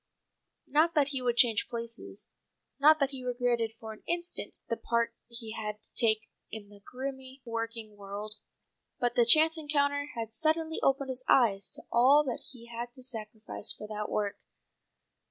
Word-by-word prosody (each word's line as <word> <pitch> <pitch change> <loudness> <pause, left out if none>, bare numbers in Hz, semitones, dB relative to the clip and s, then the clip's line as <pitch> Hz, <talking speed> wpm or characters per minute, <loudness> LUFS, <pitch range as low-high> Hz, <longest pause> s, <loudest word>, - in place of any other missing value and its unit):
Not 320 +4 +2
that 285 -2 +3
he 270 -2 -2
would 240 -1 0
change 230 -5 +5
places, 235 0 -5 0.5
not 310 +2 +7
that 275 -1 +1
he 265 -2 -7
regretted 240 -2 0
for 220 -1 -7
an 215 - -16
instant 345 0 -3
the 230 - -1
part 235 0 0
he 235 -2 -8
had 210 -1 -5
to - - -15
take 220 -2 +3 0.3
in 205 -2 -8
the 205 -1 -15
grimy 265 +1 -7
working 230 -2 -4
world. 205 +1 -6 0.6
But 245 -1 +1
the 240 -1 +3
chance 320 +5 +8
encounter 285 -1 +1
had 225 -1 -5
suddenly 320 +5 0
opened 275 0 +2
his 255 0 -3
eyes 205 -6 +4
to - - -8
all 265 +5 +6
that 255 -4 -3
he 240 -3 -12
had 235 -1 -10
had 240 - -36
to 255 - -11
sacrifice 220 -3 -2
for - - -8
that 210 -1 -4
work. 205 -1 -2
240 Hz, 175 wpm, -30 LUFS, 220-275 Hz, 0.6 s, chance